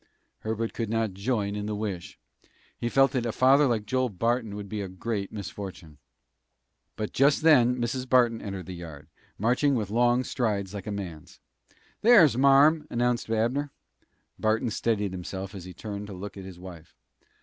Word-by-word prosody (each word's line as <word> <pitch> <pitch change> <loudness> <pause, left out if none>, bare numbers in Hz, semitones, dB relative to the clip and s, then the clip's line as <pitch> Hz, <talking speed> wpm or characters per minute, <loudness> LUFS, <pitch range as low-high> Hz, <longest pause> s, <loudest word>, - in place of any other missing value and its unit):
Herbert 110 +1 -3
could 115 -3 -3
not 115 -3 0
join 100 0 -1
in 105 0 -4
the 105 - -2
wish. 100 -4 -5 0.6
He 120 - -3
felt 135 +1 +4
that 125 -3 -1
a - - -1
father 135 +5 +5
like 110 -4 0
Joel 130 +3 0
Barton 115 +2 -1
would 105 -1 -6
be 105 +1 -4
a 100 - -4
great 100 +2 -4
misfortune. 95 -5 -8 1.0
But 105 -1 -4
just 140 +3 +3
then 125 -6 +5
Mrs. 125 +2 -2
Barton 120 -3 +3
entered 100 -3 -6
the 95 - -7
yard, 80 -4 -10 0.3
marching 125 +6 +2
with 105 -4 -2
long 120 +2 +3
strides 105 -7 -2
like 100 0 -7
a - - -2
man's. 90 -7 -7 0.6
"Here's 205 - +7
marm!" 140 +4 +5
announced 120 -1 0
Abner. 120 +6 0 0.7
Barton 110 +1 +1
steadied 105 -2 0
himself 95 +2 -6
as 95 -3 -8
he 90 - -9
turned 105 +1 -6
to 100 - -8
look 100 +2 -7
at 95 -1 -8
his 95 -2 -10
wife. 90 -3 -12
110 Hz, 170 wpm, -27 LUFS, 100-125 Hz, 1.0 s, Here's